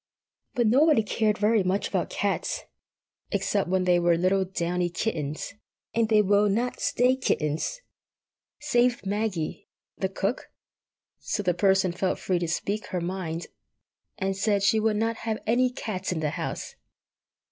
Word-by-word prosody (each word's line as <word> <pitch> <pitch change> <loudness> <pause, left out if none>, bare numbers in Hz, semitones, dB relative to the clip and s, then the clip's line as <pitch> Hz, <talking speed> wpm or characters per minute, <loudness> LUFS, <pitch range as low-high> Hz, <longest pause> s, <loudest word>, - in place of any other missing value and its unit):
But 240 - +2
nobody 275 +2 +5
cared 210 0 +1
very 215 +1 +3
much 185 +2 0
about - - -1
cats—except 195 -2 -3
when 185 0 +2
they 180 -1 +4
were 170 -1 +3
little 190 +2 +2
downy 180 -1 -1
kittens, 160 -6 -3 0.4
and 230 -1 +1
they 215 -1 +5
will 205 +1 +3
not 235 +5 -1
stay 250 +2 +2
kittens!—save 245 - -2
Maggie, 200 -5 -2 0.3
the 190 - 0
cook; 195 +5 -2 0.7
so 205 - -2
the 180 -2 +2
Person 190 0 +3
felt 185 +2 -1
free 180 -2 0
to 170 - -2
speak 200 +6 -2
her 185 - -2
mind, 170 -2 -3 0.7
and 195 0 -1
said 200 0 +1
she 210 +2 +4
would 215 -1 +1
not 225 +1 0
have 220 -1 -2
any 250 +3 +3
cats 190 -7 -4
in 175 - -1
the 155 -2 -1
house. - - -4
200 Hz, 145 wpm, -26 LUFS, 180-225 Hz, 0.7 s, nobody